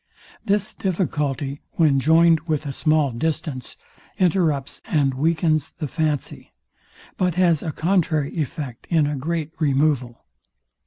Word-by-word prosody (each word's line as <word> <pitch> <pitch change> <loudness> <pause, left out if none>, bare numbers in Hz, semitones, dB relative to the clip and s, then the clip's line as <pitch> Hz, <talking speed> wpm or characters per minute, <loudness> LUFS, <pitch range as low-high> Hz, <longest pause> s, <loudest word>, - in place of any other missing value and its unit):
This 205 +1 0
difficulty, 150 -7 -2
when 150 -5 +3
joined 165 +3 +5
with 155 -1 -1
a 140 - -4
small 155 -1 +2
distance, 145 0 -3 0.4
interrupts 160 -7 +1
and 145 -9 +1
weakens 155 +1 +1
the 155 -3 -5
fancy: 150 -2 -3 0.6
But 180 -3 +1
has 175 -4 +3
a 160 - -3
contrary 155 -4 0
effect 140 -5 -4
in 160 -3 +3
a 145 0 -1
great 155 +2 -3
removal. 140 -5 0
155 Hz, 120 wpm, -22 LUFS, 140-165 Hz, 0.6 s, joined